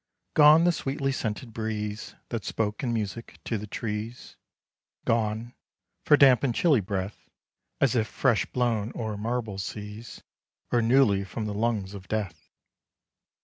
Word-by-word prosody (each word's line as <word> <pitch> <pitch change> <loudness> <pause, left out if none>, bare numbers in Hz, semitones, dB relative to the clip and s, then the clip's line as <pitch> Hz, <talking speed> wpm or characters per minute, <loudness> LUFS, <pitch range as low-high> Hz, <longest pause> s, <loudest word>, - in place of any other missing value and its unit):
Gone 155 +2 +7
the 175 - +5
sweetly 135 -3 -2
scented 115 -2 -4
breeze 105 -1 -4
That 115 -4 -3
spoke 105 -2 -2
in 125 - -1
music 110 0 -4
to 115 - -1
the 105 - -7
trees; 110 +2 -5 0.7
Gone 115 +1 0 0.5
for 150 - +6
damp 135 -3 +6
and 125 -4 +1
chilly 155 -8 +4
breath, 95 +1 -5 0.5
As 130 -2 +3
if 110 -2 +2
fresh 120 -4 +1
blown 115 -3 0
o'er 110 -2 -3
marble 110 -1 -3
seas, 105 +3 -7 0.5
Or 120 - +3
newly 115 -4 +4
from 105 +3 -5
the 105 - -3
lungs 105 -2 -1
of 95 -2 -9
Death. 95 -8 -4
110 Hz, 145 wpm, -27 LUFS, 105-125 Hz, 0.7 s, Gone